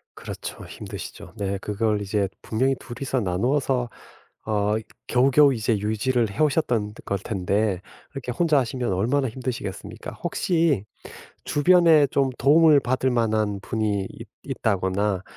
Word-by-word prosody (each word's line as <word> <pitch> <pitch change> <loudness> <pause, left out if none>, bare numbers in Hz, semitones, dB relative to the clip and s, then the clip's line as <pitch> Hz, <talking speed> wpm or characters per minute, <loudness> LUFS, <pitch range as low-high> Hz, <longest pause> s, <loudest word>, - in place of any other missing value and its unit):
그렇죠. - - -7
힘드시죠. - - -9
네. 100 -1 -2
그걸 105 +1 -1
이제 100 0 0
분명히 130 +5 0
둘이서 130 +1 -3
나누어서 125 +6 0 0.6
어 105 -1 +1 0.3
겨우겨우 135 +2 +5
이제 110 -1 0
유지를 110 +3 0
해 100 - -7
오셨던 125 -8 +1
걸 100 - -1
텐데 100 -1 -1 0.3
그렇게 135 -3 -5
혼자 155 +2 +3
하시면 125 -3 -1
얼마나 125 +9 +1
힘드시겠습니까? 120 -5 -6
혹시 165 - +1 0.6
주변에 160 -1 +5
좀 135 0 +1
도움을 150 0 +6
받을 130 +1 0
만한 110 -4 0
분이 105 -3 -1
있 - - -11 0.2
있다거나 100 -1 0
115 Hz, 300 characters per minute, -24 LUFS, 105-135 Hz, 0.6 s, 도움을